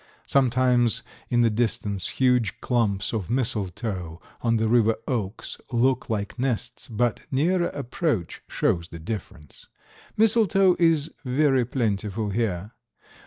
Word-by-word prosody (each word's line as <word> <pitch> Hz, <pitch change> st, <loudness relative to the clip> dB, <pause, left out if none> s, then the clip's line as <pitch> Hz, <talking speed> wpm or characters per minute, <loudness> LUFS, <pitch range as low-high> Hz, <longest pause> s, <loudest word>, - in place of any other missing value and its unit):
Sometimes 125 Hz, -3 st, +3 dB, 0.3 s
in 120 Hz, -1 st, +3 dB
the 115 Hz, -1 st, +3 dB
distance 105 Hz, -3 st, -1 dB
huge 125 Hz, -7 st, +1 dB
clumps 105 Hz, -5 st, 0 dB
of 105 Hz, -7 st, -3 dB
mistletoe 100 Hz, -7 st, -2 dB, 0.2 s
on 115 Hz, -1 st, +2 dB
the 110 Hz, 0 st, +1 dB
river 115 Hz, -1 st, +4 dB
oaks 110 Hz, -5 st, -3 dB
look 130 Hz, +2 st, +1 dB
like 105 Hz, +1 st, -3 dB
nests, 125 Hz, -4 st, -2 dB
but 120 Hz, 0 st, 0 dB
nearer 170 Hz, +6 st, +2 dB
approach 140 Hz, -, -2 dB
shows 85 Hz, -1 st, 0 dB
the 85 Hz, -, -9 dB
difference. 80 Hz, -, -8 dB, 0.5 s
Mistletoe 200 Hz, -4 st, +4 dB
is 165 Hz, -2 st, +2 dB
very 135 Hz, -1 st, +2 dB
plentiful 105 Hz, -3 st, -1 dB
here. 105 Hz, -2 st, -2 dB
120 Hz, 120 wpm, -25 LUFS, 105-130 Hz, 0.5 s, river